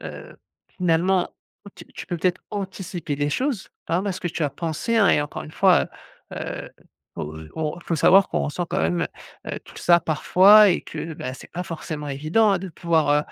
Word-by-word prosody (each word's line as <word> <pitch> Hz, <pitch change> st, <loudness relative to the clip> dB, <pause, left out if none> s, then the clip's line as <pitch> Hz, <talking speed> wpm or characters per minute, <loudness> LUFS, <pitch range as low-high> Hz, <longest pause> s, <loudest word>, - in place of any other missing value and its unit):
heu, -, -, -9 dB, 0.4 s
finalement, 180 Hz, +1 st, +2 dB, 0.5 s
tu -, -, -11 dB
tu -, -, -8 dB
peux 175 Hz, -, -3 dB
peut-être 180 Hz, +2 st, 0 dB
anticiper 190 Hz, -5 st, -4 dB
des 145 Hz, +1 st, -1 dB
choses. 255 Hz, -, -2 dB, 0.2 s
Hein, 170 Hz, +3 st, +1 dB
parce 195 Hz, -2 st, -3 dB
que -, -, -4 dB
tu 165 Hz, -1 st, -4 dB
as 145 Hz, -, +1 dB
pensé 170 Hz, -, -2 dB
hein 205 Hz, -4 st, +5 dB
et -, -, +4 dB
encore 145 Hz, 0 st, -5 dB
une 155 Hz, -, -11 dB
fois, 190 Hz, 0 st, +4 dB, 0.4 s
heu, -, -, -7 dB
heu, -, -, -5 dB, 0.4 s
oh, 75 Hz, +1 st, -6 dB
heu, 80 Hz, -1 st, -10 dB
on 160 Hz, +1 st, -3 dB
faut 170 Hz, -, -2 dB
savoir 190 Hz, +5 st, +5 dB
qu'on -, -, -1 dB
ressent 170 Hz, +4 st, -3 dB
quand -, -, -1 dB
même, 85 Hz, +2 st, 0 dB, 0.4 s
heu, -, -, -4 dB
tout -, -, -15 dB
ça 175 Hz, 0 st, +4 dB
parfois 195 Hz, +7 st, +6 dB
et 175 Hz, -, +1 dB
que 160 Hz, -1 st, -6 dB
bah 130 Hz, -3 st, -5 dB
c'est 130 Hz, -, -12 dB
pas 180 Hz, -, -3 dB
forcément 155 Hz, -3 st, -6 dB
évident 155 Hz, +11 st, +2 dB
hein 195 Hz, -, +2 dB
de 190 Hz, +1 st, -6 dB
pouvoir, 165 Hz, -2 st, +1 dB
heu, 145 Hz, -, +5 dB
170 Hz, 205 wpm, -23 LUFS, 150-190 Hz, 0.5 s, parfois